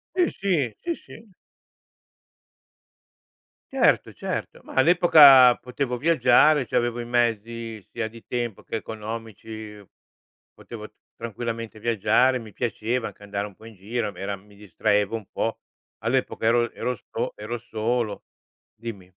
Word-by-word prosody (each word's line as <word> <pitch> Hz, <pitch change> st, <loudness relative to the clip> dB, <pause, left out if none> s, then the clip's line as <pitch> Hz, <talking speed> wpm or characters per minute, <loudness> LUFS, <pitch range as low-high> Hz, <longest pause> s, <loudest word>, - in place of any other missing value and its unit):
Sì 360 Hz, -2 st, +3 dB
sì, 160 Hz, -, -1 dB
sì 340 Hz, -1 st, -3 dB
sì. 225 Hz, -2 st, -15 dB, 2.4 s
Certo, -, -, +3 dB
certo, -, -, -5 dB
ma -, -, -12 dB
all'epoca 140 Hz, -5 st, +8 dB
potevo 125 Hz, 0 st, -3 dB
viaggiare, 145 Hz, -1 st, +4 dB
c'avevo 120 Hz, 0 st, 0 dB
i 120 Hz, -, -4 dB
mezzi 115 Hz, -2 st, -1 dB
sia 115 Hz, -2 st, -3 dB
di 115 Hz, 0 st, -13 dB
tempo 120 Hz, -4 st, -3 dB
che -, -, -5 dB
economici, 110 Hz, -1 st, -7 dB, 0.7 s
potevo -, -, -9 dB, 0.3 s
tranquillamente 115 Hz, -1 st, -5 dB
viaggiare, 115 Hz, +4 st, +3 dB
mi 110 Hz, -4 st, -10 dB
piaceva 120 Hz, 0 st, -2 dB
anche 105 Hz, -, -12 dB
andare 100 Hz, 0 st, -3 dB
un 100 Hz, -, -15 dB
po' 110 Hz, -, -16 dB
in 115 Hz, -, -11 dB
giro, 105 Hz, +3 st, -3 dB
mi 90 Hz, -, -14 dB
era 100 Hz, +1 st, -3 dB
mi 100 Hz, +1 st, -19 dB
distraevo 105 Hz, +2 st, 0 dB
un 110 Hz, -3 st, -6 dB
po'. 115 Hz, -, -2 dB, 0.5 s
All'epoca 120 Hz, -1 st, 0 dB
ero 120 Hz, 0 st, +3 dB
ero 125 Hz, 0 st, -3 dB
so -, -, -3 dB
ero 110 Hz, +3 st, -5 dB
solo. 115 Hz, -1 st, -2 dB, 0.5 s
Dimmi. 105 Hz, -5 st, -8 dB
115 Hz, 130 wpm, -25 LUFS, 110-125 Hz, 2.4 s, all'epoca